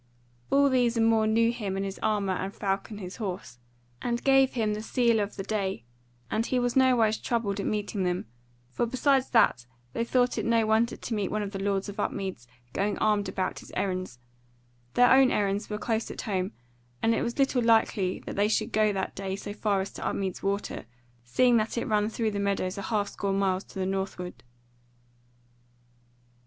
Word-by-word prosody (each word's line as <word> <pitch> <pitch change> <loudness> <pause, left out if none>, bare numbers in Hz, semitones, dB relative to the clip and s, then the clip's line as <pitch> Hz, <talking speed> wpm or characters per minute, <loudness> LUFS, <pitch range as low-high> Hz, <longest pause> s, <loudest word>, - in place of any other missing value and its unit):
All 280 0 +5
these 245 -3 +2
and 225 - +4
more 225 -1 +3
knew 230 +1 +3
him 205 -5 -4
and 195 - -1
his 195 0 -5
armour 205 -3 +1
and 190 +1 -3
Falcon 200 +1 -3
his 185 -2 -7
horse, 185 - -5 0.4
and 240 0 -2
gave 270 -1 +4
him 220 -3 0
the 210 - -4
sele 235 0 +2
of 205 0 -2
the 195 - -4
day, 195 - -2 0.5
and 220 - +1
he 255 - -1
was 245 -1 0
nowise 245 -5 +4
troubled 215 -4 -1
at 200 - -2
meeting 210 -1 -2
them; 180 0 -1 0.5
for 235 - 0
besides 265 +2 +2
that 125 - +3 0.3
they 230 - 0
thought 245 +1 +1
it - - -2
no 230 -1 +3
wonder 220 +2 +2
to 235 - -5
meet 205 -3 -1
one 215 0 -1
of 200 - -5
the 195 - -5
lords 195 0 0
of 200 - -7
Upmeads 190 - -3 0.3
going 205 +1 0
armed 210 -2 +1
about 185 0 -2
his - - -13
errands, 185 -8 -2 0.8
their 245 0 +6
own 265 -1 +6
errands 205 -1 0
were 210 - -2
close 225 0 -1
at - - -6
home, 190 -4 -2 0.5
and 225 - +4
it - - 0
was 235 - -2
little 270 -2 +2
likely 220 -5 +2
that - - -5
they 205 +1 +3
should 215 +1 0
go 215 -1 +3
that 190 -1 -3
day 190 -1 -3
so 205 +1 -6
far 205 -2 0
as 195 - -5
to - - -7
Upmeads 190 -2 -2
Water, 200 - -2 0.4
seeing 240 - +3
that 220 +2 -1
it 235 - -1
ran 210 0 +1
through 225 -1 -1
the 200 - -3
meadows 200 -2 -1
a 200 - -5
half 205 0 -1
score 200 -1 -2
miles 195 -1 0
to - - -12
the 190 - -1
north 190 0 -2
ward. 180 0 -7
210 Hz, 200 wpm, -28 LUFS, 195-230 Hz, 0.8 s, their